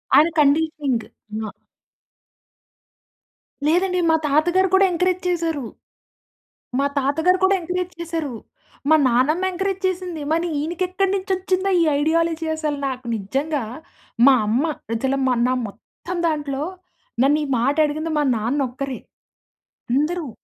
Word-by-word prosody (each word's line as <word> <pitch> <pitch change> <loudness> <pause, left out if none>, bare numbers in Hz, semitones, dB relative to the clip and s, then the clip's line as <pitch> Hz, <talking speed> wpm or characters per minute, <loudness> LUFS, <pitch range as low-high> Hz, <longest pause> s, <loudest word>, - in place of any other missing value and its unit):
ఆయన 305 +4 +6
కండిషనింగ్ 290 -4 +2
అయినా 215 0 -7 2.2
లేదండి. 365 +2 +2
మా 320 - +5
తాత 305 +3 +3
గారు 380 0 +4
కూడా 390 0 +6
ఎంకరేజ్ 360 +1 0
చేసారు. 330 -5 -1 1.1
మా 280 - +2
తాతగారు 320 +7 +2
కూడా 390 +1 +5
ఎంకరేజ్ 360 +1 -3
చేసారు. 325 -6 -3 0.6
మా 315 - +7
నానమ్మ 290 +10 +2
ఎంకరేజ్ 385 +1 -2
చేసింది. 360 -4 -4
మని 335 +2 +1
ఈయనకెక్కడి 365 +4 -1
నుంచొచ్చిందో 380 0 0
ఈ - - +5 0.2
ఐడియాలజీ 325 +1 +1
అసలు, 300 -2 -2
నాకు 255 -1 -5
నిజంగా 270 +7 -2 0.6
మా 275 - +8
అమ్మ 240 +7 +2 0.3
అసల 265 +4 0
మా 255 - +3
నా 255 - +2
మొత్తం 290 - -9
దాంట్లో 295 -2 -2 0.6
నన్ను 290 +3 +4
ఈ - - -6
మాటడిగింది 305 +4 +1
మా - - +2
నాన్నొక్కరే. 260 +3 -2 1.0
అందరూ 305 0 0
315 Hz, 115 wpm, -22 LUFS, 275-360 Hz, 2.2 s, మా